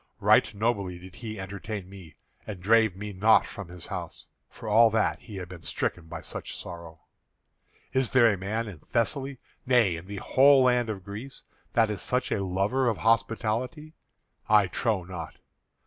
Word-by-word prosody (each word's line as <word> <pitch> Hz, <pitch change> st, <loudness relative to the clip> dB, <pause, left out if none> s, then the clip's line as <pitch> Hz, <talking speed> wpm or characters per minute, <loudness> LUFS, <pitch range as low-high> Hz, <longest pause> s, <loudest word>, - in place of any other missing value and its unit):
Right -, -, +4 dB
nobly 100 Hz, -4 st, -1 dB
did 90 Hz, +1 st, -12 dB
he 110 Hz, -3 st, -7 dB
entertain 100 Hz, 0 st, -6 dB
me, 95 Hz, -4 st, -13 dB, 0.3 s
and 100 Hz, -4 st, -6 dB
drave 110 Hz, +1 st, +3 dB
me 105 Hz, +1 st, -6 dB
not 105 Hz, +4 st, +5 dB
from 105 Hz, -4 st, -8 dB
his 90 Hz, 0 st, -8 dB
house, -, -, -7 dB, 0.2 s
for 115 Hz, -, -10 dB
all 115 Hz, +2 st, +6 dB
that 110 Hz, 0 st, +1 dB
he 110 Hz, -, -11 dB
had 90 Hz, -2 st, -6 dB
been 90 Hz, -2 st, -10 dB
stricken 80 Hz, +1 st, -3 dB
by -, -, -7 dB
such -, -, -7 dB
sorrow. 85 Hz, -2 st, -9 dB, 0.9 s
Is 130 Hz, -2 st, +2 dB
there 120 Hz, -5 st, +5 dB
a -, -, -1 dB
man 105 Hz, +5 st, -3 dB
in 95 Hz, -7 st, -9 dB
Thessaly, 135 Hz, -, -1 dB, 0.3 s
nay 120 Hz, -8 st, +3 dB
in 85 Hz, +2 st, -9 dB
the 100 Hz, -, -6 dB
whole 135 Hz, +6 st, +5 dB
land 125 Hz, -2 st, +2 dB
of 95 Hz, -4 st, -5 dB
Greece, 110 Hz, +7 st, -8 dB, 0.3 s
that 115 Hz, -4 st, +3 dB
is 105 Hz, -, -4 dB
such 125 Hz, 0 st, -1 dB
a 100 Hz, -, 0 dB
lover 100 Hz, +8 st, 0 dB
of 115 Hz, -, -1 dB
hospitality? 115 Hz, +6 st, 0 dB, 0.6 s
I 105 Hz, -2 st, +6 dB
trow 100 Hz, +1 st, -1 dB
not. 90 Hz, -2 st, -8 dB
105 Hz, 175 wpm, -27 LUFS, 95-115 Hz, 0.9 s, all